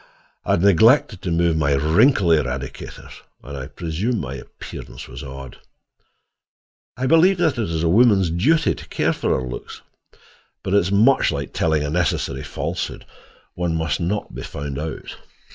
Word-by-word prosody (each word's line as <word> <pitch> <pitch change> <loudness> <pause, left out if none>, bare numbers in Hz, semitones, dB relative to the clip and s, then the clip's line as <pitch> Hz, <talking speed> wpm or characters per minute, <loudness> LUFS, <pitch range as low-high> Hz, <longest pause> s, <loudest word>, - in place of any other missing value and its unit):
I - - +2
had 85 - +1
neglected 110 - +4
to 90 - -3
remove 85 -1 +2
my 70 -2 +2
wrinkle 85 - +3
eradicators, 65 -4 -2 0.2
and 70 +2 -8
I 65 -2 -6
presume 90 +9 -3
my 65 -2 -5
appearance - - -9
was - - -9
odd. 65 -1 -9 1.4
I 130 - -2
believe 165 +7 +5
that 160 -8 +1
it 110 - -1
is 80 -1 -2
a - - +2
woman's 100 -2 +4
duty 140 - +2
to - - -11
care - - 0
for - - 0
her 65 - -5
looks, 60 - -8 0.8
but 95 - -2
it - - +6
is 95 0 -2
much 110 +5 +4
like 70 -2 -4
telling 80 -2 +1
a 75 - -3
necessary 75 -5 -1
falsehood—one 85 +4 -5
must 80 -1 -1
not 95 +4 -2
be - - -6
found 70 -1 -5
out. 80 +1 -6
85 Hz, 160 wpm, -21 LUFS, 70-105 Hz, 1.4 s, it